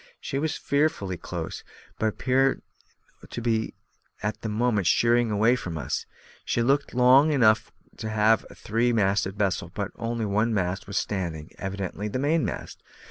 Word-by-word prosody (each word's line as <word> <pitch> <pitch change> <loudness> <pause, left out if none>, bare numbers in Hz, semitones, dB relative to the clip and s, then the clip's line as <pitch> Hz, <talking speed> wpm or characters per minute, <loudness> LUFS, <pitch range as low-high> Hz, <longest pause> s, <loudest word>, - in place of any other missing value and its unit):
She 135 - -3
was 155 +1 -1
fearfully 140 - 0
close, - - -6 0.4
but 110 - +2
appeared 130 +4 +1 0.7
to - - -5
be 110 -1 -1 0.5
at 105 +1 -2
the 110 - -3
moment 105 -3 +1
sheering 120 +3 +3
away 110 +4 +3
from 85 -9 -5
us. 70 - -3 0.4
She 115 - 0
looked 140 +1 +1
long 130 +5 +6
enough 110 -6 +3 0.3
for 110 - -4
a 110 +1 +2
three 115 +3 0
masted 100 -2 +1
vessel, 95 -4 0
but 100 +1 -3
one 115 -1 0
mast 90 -1 -1
only - - -29
was 100 -1 -3
standing, 85 -6 -3
evidently 95 +1 -4
the 105 - -3
mainmast. 145 +1 -1
110 Hz, 150 wpm, -26 LUFS, 100-125 Hz, 0.7 s, long